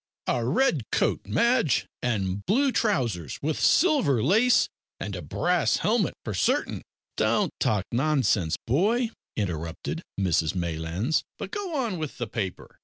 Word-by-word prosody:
"A 120 - 0
red 150 - +2
coat, - - 0
Madge, 230 - +2 0.2
and 100 -5 -1
blue 265 +7 +3
trousers 120 - 0
with 155 +1 -1
silver 275 - +3
lace 220 - +4 0.3
and - - -4
a - - -5
brass 175 -1 +1
helmet, 215 -4 +1
for 110 - -3
certain 90 - 0 0.2
" - - -55
"Don't - - +2
talk 100 -2 +1
nonsense, 120 - +2
boy," 220 - +2 0.2
interrupted 85 -6 -3 0.2
Mrs 85 -3 +1
Maylands, 85 - -1 0.2
"but - - -6
go 400 -6 -4
on 230 - -1
with 155 -3 -5
the 120 - -2
paper." 100 -4 -5
130 Hz, 140 wpm, -26 LUFS, -, 0.3 s, lace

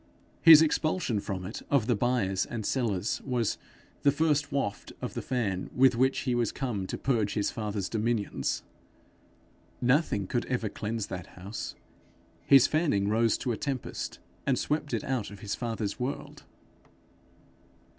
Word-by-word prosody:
His 160 -2 +10
expulsion 155 - 0
from 95 -2 -4
it 105 - -6
of 140 -6 +3
the 120 0 +2
buyers 105 -4 +1
and 110 -3 -4
sellers, 110 -6 0
was 125 -5 -1 0.4
the 145 - +5
first 150 -1 +1
waft 135 -8 -2
of - - -5
the - - -3
fan 105 -8 -2
with 130 -1 +5
which 130 +3 +2
he 125 - 0
was 120 -2 +1
come 110 -8 -3
to - - -4
purge 115 -6 0
his 105 -2 0
father's 105 -3 -3
dominions. 110 -1 -1 1.2
Nothing 125 - +2
could 120 +5 -2
ever 120 -4 -1
cleanse 110 +1 -3
that 90 -3 -6
house; 100 +4 -6 0.7
his 135 -2 +8
fanning 145 -11 +1
rose 115 +1 +3
to 125 - -2
a 110 - -2
tempest, 135 -4 -4 0.3
and 135 -2 +3
swept 150 +2 -1
it 115 -3 -1
out 130 -6 -2
of 100 0 -11
his 105 -3 -3
father's 115 -4 -3
world. 130 +3 -5
120 Hz, 155 wpm, -29 LUFS, 105-135 Hz, 1.2 s, His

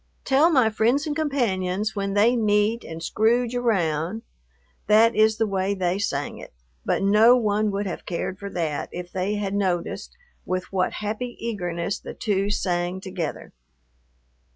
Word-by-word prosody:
"Tell 275 +5 +4
my 255 -9 +4
friends 240 +8 +2
and 300 -2 -2
companions 215 - -1
when 195 0 -2
they 225 +4 +4
meet 215 0 +2
and 165 0 -8
scrouge 235 +5 +1
around"; 195 -5 0 0.6
that 220 +2 +5
is 220 0 +4
the 225 - +2
way 195 -1 -1
they 185 0 0
sang 145 -8 -2
it, - - -11 0.3
but - - 0
no 215 +5 +6
one 215 -2 +1
would 200 +1 -2
have 185 - -6
cared 185 +2 -3
for 200 - -6
that, 160 -6 -3
if 175 0 -7
they 190 +3 -1
had 200 -1 -2
noticed 185 -4 -2 0.3
with 185 0 -2
what 185 -1 +1
happy 220 +4 -4
eagerness 185 -5 -3
the - - -9
two 200 -2 0
sang 180 -2 -1
together. 185 -5 -5
205 Hz, 155 wpm, -24 LUFS, 185-225 Hz, 0.6 s, no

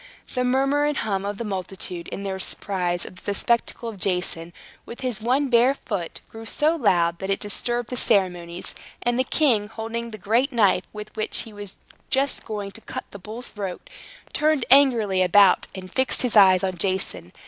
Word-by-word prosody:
The 250 - 0
murmur 270 +3 +2
and 295 0 0
hum 200 -2 -1
of 205 0 -4
the 235 - -4
multitude, 185 -3 -5
in 200 - -6
their 190 -1 -3
surprise 180 -3 -1
at 180 - -11
the 200 +2 -3
spectacle 235 +2 0
of 215 -4 -7
Jason 180 -2 +1 0.3
with 235 - -10
his 245 -5 -2
one 260 +5 +1
bare 250 +2 +4
foot, 195 -10 -5
grew 225 0 -10
so 305 +7 +2
loud 170 - +2
that 190 - -5
it 195 - +1
disturbed 240 +3 -2
the 250 - -3
ceremonies; 180 -6 0 0.3
and 240 +1 +1
the - - +4
king, 245 -7 +2
holding 225 +2 -5
the 215 - -8
great 230 +8 +1
knife 205 -6 +3
with 210 0 -9
which 215 - -1
he 225 - -12
was 205 -2 -9 0.3
just 270 +1 0
going 205 -3 -5
to - - -12
cut - - -6
the 200 - -9
bull's 220 +6 -7
throat, 195 - -6 0.4
turned 305 -4 +2
angrily 235 -9 +5
about, 190 +1 +5
and 185 -1 -9
fixed 260 0 +2
his 245 -3 0
eyes 190 -3 +7
on 185 -2 -2
Jason. 185 - -1
210 Hz, 190 wpm, -24 LUFS, 190-245 Hz, 0.4 s, eyes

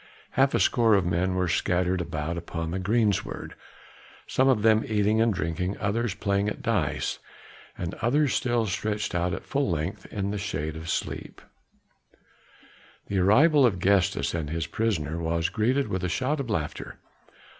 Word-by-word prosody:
Half 135 +1 +3
a - - +2
score 115 -4 +4
of 95 -2 +2
men 90 +2 0
were 90 0 +1
scattered 90 +1 +1
about 80 0 -3
upon 85 -1 -4
the 95 - -2
greensward, 105 +1 0 0.7
some 130 - +2
of 115 -6 +2
them 110 0 +5
eating 105 +1 +2
and 115 0 +3
drinking, 90 +1 -2
others 105 +1 -1
playing 100 0 0
at - - -7
dice, 100 -11 -1 0.6
and 85 -1 -4
others 135 +4 +2
still 120 -2 +1
stretched 105 +1 -2
out 90 +1 0
at 90 - -5
full 140 -5 0
length 85 +2 -3
in 100 -1 -3
the 105 - -3
shade 80 -6 -3
asleep. 80 0 -4 1.7
The 100 - 0
arrival 140 - +5
of 115 -7 +3
Gestas 95 -5 +2
and 80 -3 -3
his 80 0 -2
prisoner 85 -8 -1
was 85 0 0
greeted 125 +5 +1
with 95 0 -3
a 90 - 0
shout 130 - -1
of 135 -4 -4
laughter. 80 -8 -3
100 Hz, 160 wpm, -26 LUFS, 85-110 Hz, 1.7 s, them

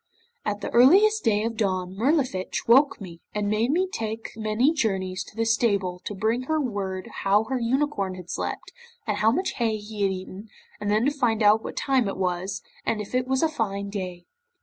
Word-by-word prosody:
'At 210 0 -2
the - - -4
earliest 390 - +5
dawn 215 -1 +2
of 230 -1 -3
day 220 - +2
Mirlifiche 190 - -1
woke 270 +5 +5
me, 175 -4 -10
and 210 -1 0
made 215 +4 +1
me 360 +6 +2
take 225 - -5
many 220 +7 +1
journeys 190 - -1
to - - -15
the 225 0 0
stable 200 -6 +1
to 205 - -4
bring 225 +5 0
her 315 +2 0
word 195 -8 -3 0.2
how 200 +2 +3
her 260 +3 -2
unicorn 235 -6 0
had 180 -2 -10
slept, - - -4 0.3
and 210 -2 -1
how 215 +2 +4
much 360 +12 0
hay 225 -3 +1
he 210 0 -7
had 195 -1 +3
eaten, 190 +3 -7 0.3
and 205 - -3
then 215 +3 +2
to 285 - +3
find 240 -6 +1
out 210 +2 +5
what - - -7
time 265 -5 +2
it 195 - -3
was, 185 +1 -2 0.2
and 220 - -1
if 210 +2 -7
it 255 0 +1
was 265 +2 +1
a - - +5
fine 200 -9 -3
day. 180 -3 -5
215 Hz, 205 wpm, -25 LUFS, 195-250 Hz, 0.3 s, earliest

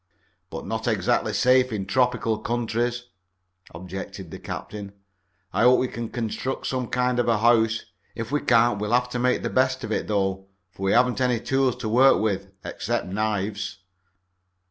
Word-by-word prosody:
"But - - -7
not - - -3
exactly - - +1
safe 130 0 +3
in 100 -3 -3
tropical 120 0 +1
countries," 120 +1 -2 0.6
objected 95 +1 -8
the - - -8
captain. 100 -1 -7 0.6
"I - - +1
hope 125 +2 +6
we 130 - +1
can 115 -2 -5
construct 120 +3 -3
some 130 -2 -2
kind 125 0 0
of 120 - +1
a 115 -2 +3
house. 115 0 +3 0.3
If 115 +2 -5
we 150 - +1
can't 115 -3 +3
we'll 105 +2 -2
have 125 0 +2
to 125 - -3
make 125 +1 +1
the - - -1
best 130 0 +1
of 110 - -5
it, - - -1
though, 95 -2 -1 0.2
for 95 - -15
we 95 0 +1
haven't 125 +1 +3
any 125 -2 +2
tools 135 +1 +1
to - - -5
work 130 +5 +5
with, 100 -3 -1 0.2
except 120 +6 -2
knives." 100 0 -2
115 Hz, 170 wpm, -24 LUFS, 105-125 Hz, 0.6 s, hope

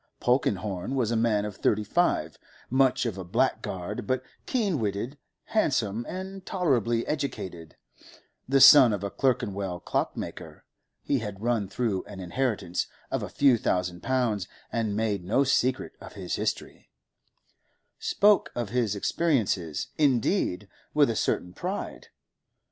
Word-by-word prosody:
Polkenhorne 105 -3 0
was 120 -4 +1
a - - +1
man 110 -2 +2
of 105 -2 -6
thirty 105 0 +1
five, - - 0 0.3
much 130 -1 +3
of 105 -5 -3
a - - -4
blackguard, 90 +2 -2
but 130 -1 0 0.2
keen 205 - 0
witted, 105 +5 -2 0.3
handsome, 120 - 0
and 190 +1 -6
tolerably 120 - +1
educated; 95 - -4 0.7
the 135 0 +4
son 130 -4 +9
of 100 -1 -3
a 100 - -3
Clerkenwell 100 -8 -1
clockmaker, - - -4 0.4
he 140 - +1
had 105 -2 -6
run 115 -4 +1
through 100 -1 -1
an 100 -2 -10
inheritance 95 -1 -1 0.2
of - - -1
a - - -5
few 135 -5 +4
thousand 90 -2 -1
pounds, 120 -7 0 0.2
and 110 -3 -1
made 105 -4 -1
no 110 +10 +2
secret 130 -1 +1
of - - -10
his - - -5
history—spoke 205 0 -2
of 120 -4 -2
his 115 -3 0
experiences, 100 - 0
indeed, 125 - +1 0.3
with 145 -5 +5
a - - -3
certain 90 -3 -1
pride. 185 - -5
115 Hz, 130 wpm, -27 LUFS, 100-135 Hz, 0.7 s, son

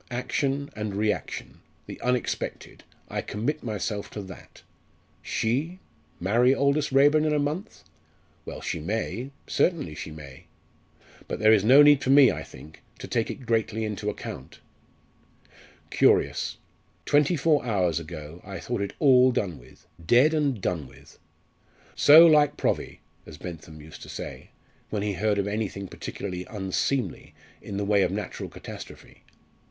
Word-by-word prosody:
Action 135 +3 -2
and 105 -2 -4
reaction 105 0 -3 0.3
the - - -9
unexpected 125 0 -3 0.2
I - - -3
commit 140 +9 -3
myself 105 -2 -4
to 105 - -5
that. 95 -1 -13 0.6
She 145 +11 -2 0.4
marry 120 +8 +3
Aldous 140 +1 +1
Raeburn 145 +3 +5
in 155 -1 +1
a - - +2
month? 150 +9 -3 0.6
Well, - - -8
she - - -3
may 110 - -3 0.2
certainly 160 - 0
she 75 - -7
may. 70 -4 -11 0.8
But - - -3
there 110 +1 +5
is 105 -3 +4
no 135 +6 +8
need 145 -1 +6
for - - -2
me, 135 -2 +7
I - - -5
think, 80 - -13 0.2
to - - -8
take 115 -2 -1
it 130 - -7
greatly 110 -1 0
into 105 -1 -3
account. 105 - -8 1.3
Curious! - - +2 0.5
twenty 145 +3 +3
four 150 0 +2
hours 90 -8 0
ago 80 0 -9
I 100 -1 -7
thought 120 -4 -3
it 100 - -3
all 130 -3 +5
done 95 -8 -2
with - - -19 0.2
dead 125 - +4
and 145 -7 0
done 85 -7 -2
with. - - -18 0.8
'So 155 +3 +9
like 150 -3 +4
Provvy,' - - -2 0.3
as 80 - -10
Bentham 80 -2 -9
used 75 +1 -12
to - - -10
say, - - -8 0.4
when 105 -2 -2
he 105 -1 -1
heard 105 +3 0
of 100 - 0
anything 100 -2 -3
particularly 90 0 -6
unseemly 105 +6 -2 0.3
in 100 - -6
the 100 - -1
way 100 0 +3
of - - +1
natural - - -5
catastrophe. - - -11
110 Hz, 150 wpm, -26 LUFS, 95-140 Hz, 1.3 s, So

